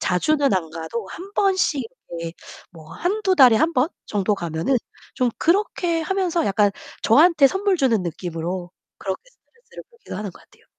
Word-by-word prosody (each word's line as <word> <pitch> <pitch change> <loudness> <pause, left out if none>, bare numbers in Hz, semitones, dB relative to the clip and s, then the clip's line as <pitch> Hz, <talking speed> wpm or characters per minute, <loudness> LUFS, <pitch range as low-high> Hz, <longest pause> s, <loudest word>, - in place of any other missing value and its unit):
자주는 280 - +2
안 175 -4 0
가도 165 +7 -5
1 375 - -9
번씩 375 -8 +2 0.4
예 165 0 -4 0.4
뭐 160 -2 -14
1-2 385 +2 0
달에 255 -8 +7
1 320 +7 +2
번 265 0 +2 0.2
정도 205 0 0
가면은 170 - -1 0.4
좀 250 -1 +1
그렇게 345 -2 +1
하면서 350 -1 0
약간 205 +1 +3 0.3
저한테 300 +4 +6
선물 385 +4 +1
주는 250 - +2
느낌으로 175 +1 -4 0.3
그렇게 190 -2 -4
스트레스를 475 -1 -16
풀기도 470 0 -10
하는 210 -2 -4
것 - - -17
같아요. - - -26
260 Hz, 305 characters per minute, -22 LUFS, -, 0.4 s, 달에